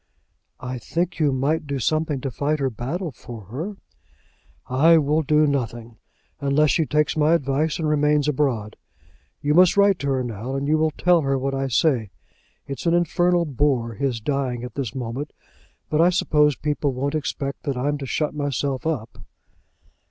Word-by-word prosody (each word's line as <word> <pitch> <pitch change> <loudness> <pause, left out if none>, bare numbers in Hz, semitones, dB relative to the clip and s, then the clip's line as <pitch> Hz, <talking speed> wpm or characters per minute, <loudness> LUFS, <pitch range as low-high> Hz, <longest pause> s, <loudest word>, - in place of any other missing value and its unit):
"I 125 0 -5
think 170 - -2
you 150 -3 +3
might 145 +4 0
do 140 -1 -2
something 155 +2 0
to 135 - -3
fight 145 +4 -1
her 135 -3 -1
battle 150 - -4
for 115 -2 -10
her." 175 - -5 0.9
"I 155 +6 +5
will 150 +1 +2
do 150 0 +3
nothing, 120 -5 -3 0.4
unless 140 +2 +2
she 160 -3 +1
takes 150 0 +1
my 155 +2 +4
advice 145 +2 0
and 160 -3 -1
remains 150 -1 +2
abroad. 130 -7 -1 0.7
You 145 +1 +2
must 180 +3 +5
write 200 -2 +4
to 140 - -3
her 130 -2 0
now, 120 +2 -5
and 135 +1 -2
you 155 +1 +2
will 160 0 +3
tell 175 +2 +2
her 135 -1 0
what 135 +1 -2
I 135 0 -1
say. 130 -4 +1 0.6
It's 140 +4 -5
an 170 - +4
infernal 175 +1 +2
bore, 130 -5 0
his 125 +1 -2
dying 130 -1 -2
at 125 - -7
this 130 -6 -4
moment; 130 +4 -5 0.5
but 155 +1 +1
I 175 - +6
suppose 150 -5 +2
people 145 0 -1
won't 140 +3 -2
expect 140 -1 -3
that 140 -3 -2
I'm 145 +3 -1
to 135 - -5
shut 150 +2 -1
myself 140 -1 -2
up." 135 -9 -4
145 Hz, 175 wpm, -23 LUFS, 130-155 Hz, 0.9 s, I